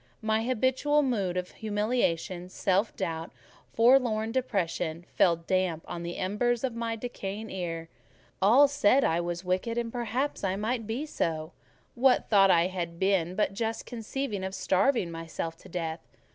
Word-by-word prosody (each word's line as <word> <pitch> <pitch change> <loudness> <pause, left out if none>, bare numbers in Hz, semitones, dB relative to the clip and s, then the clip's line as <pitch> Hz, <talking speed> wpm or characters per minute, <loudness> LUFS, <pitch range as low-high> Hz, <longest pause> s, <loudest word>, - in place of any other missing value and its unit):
My 220 0 +1
habitual 260 +4 +2
mood 200 -9 0
of 180 0 -3
humiliation, 205 -5 -1
self 195 +3 0
doubt, 165 0 -3 0.4
forlorn 230 -2 +4
depression, 175 -9 -1
fell 175 -3 +5
damp 170 -1 -1
on 175 -1 -5
the 170 0 -5
embers 230 +6 0
of 260 -3 -1
my 230 0 -2
decaying 220 -2 -6
ire. 165 -3 -4 0.5
All 240 +9 +7
said 275 -1 +3
I 165 +1 +2
was 175 +1 -4
wicked, 185 +6 -1
and 235 -1 -1
perhaps 245 +3 -2
I 190 -1 0
might 220 +2 -2
be 240 +7 -2
so; 160 - -2 0.4
what 255 +1 +3
thought 195 -2 +6
had 180 +1 +3
I - - -16
been 185 -1 +1
but 205 0 +1
just 225 +2 -3
conceiving 230 -3 -4
of 190 0 -4
starving 190 -1 +2
myself 165 0 -5
to - - -15
death? 165 -1 -3
200 Hz, 155 wpm, -28 LUFS, 175-235 Hz, 0.5 s, All